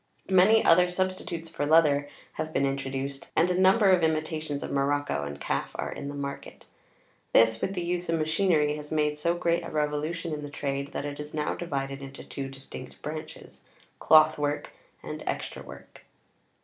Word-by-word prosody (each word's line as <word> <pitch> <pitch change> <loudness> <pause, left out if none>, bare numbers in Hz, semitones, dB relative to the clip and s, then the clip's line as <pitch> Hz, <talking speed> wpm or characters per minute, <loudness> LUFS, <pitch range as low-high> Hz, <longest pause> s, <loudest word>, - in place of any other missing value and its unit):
Many 195 +4 +6
other 180 +2 +6
substitutes 180 -2 -2
for 150 -3 -3
leather 145 -2 +4 0.2
have 155 - -4
been 140 - +1
introduced, 135 0 -3
and 175 +3 +3
a 180 +1 +1
number 195 +1 +5
of 185 -2 +4
imitations 155 -2 -1
of - - -5
morocco 140 - 0
and 70 0 -7
calf - - -2
are - - -3
in 140 - -6
the 145 - -5
market; 140 -1 -6 0.7
this, 115 0 +5
with 195 - -2
the 175 - -2
use 175 0 -2
of 165 - +2
machinery, 155 -1 +2
has 150 0 -9
made 150 -1 +1
so 170 +3 0
great 170 0 0
a - - -6
revolution 155 +2 -2
in 150 - -4
the 145 - -6
trade, 140 -1 -3
that - - -3
it 145 0 -5
is 150 +1 -7
now 150 -1 -1
divided 140 -4 -4
into 135 0 -9
two 135 -1 -6
distinct 135 -1 -10
branches—cloth 155 0 +1
work 145 0 -2 0.3
and - - -6
extra - - -3
work. - - -13
150 Hz, 175 wpm, -27 LUFS, 140-170 Hz, 0.7 s, Many